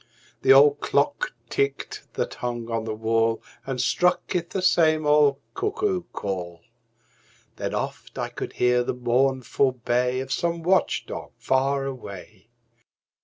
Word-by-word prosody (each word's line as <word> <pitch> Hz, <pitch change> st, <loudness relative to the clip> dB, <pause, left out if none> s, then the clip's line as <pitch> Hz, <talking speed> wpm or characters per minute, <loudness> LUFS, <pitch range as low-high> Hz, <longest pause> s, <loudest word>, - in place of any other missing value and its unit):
The -, -, +5 dB
old 145 Hz, +2 st, +7 dB
clock 140 Hz, 0 st, 0 dB, 0.2 s
ticked 140 Hz, +2 st, -2 dB
that -, -, -2 dB
hung 120 Hz, -1 st, -4 dB
on 115 Hz, -1 st, -1 dB
the 110 Hz, -1 st, -3 dB
wall 115 Hz, +1 st, +1 dB, 0.3 s
And 135 Hz, -2 st, -3 dB
struck 175 Hz, +8 st, +2 dB
'th 175 Hz, -2 st, -1 dB
the 190 Hz, -, -3 dB
same 155 Hz, -4 st, +3 dB
old 150 Hz, -2 st, +4 dB, 0.2 s
cuckoo 395 Hz, -1 st, -1 dB
call; 90 Hz, -4 st, -4 dB, 1.0 s
Then -, -, -3 dB
oft -, -, -5 dB
I -, -, -2 dB
could -, -, -6 dB
hear 125 Hz, 0 st, +3 dB
the 120 Hz, -, -2 dB
mournful 130 Hz, +2 st, +1 dB
bay 125 Hz, +1 st, 0 dB
Of 135 Hz, +1 st, -5 dB
some 170 Hz, +3 st, -1 dB
watch 185 Hz, +2 st, +2 dB
dog -, -, -7 dB
far 135 Hz, +1 st, +1 dB
away. 105 Hz, -5 st, -8 dB
130 Hz, 140 wpm, -25 LUFS, 120-150 Hz, 1.0 s, old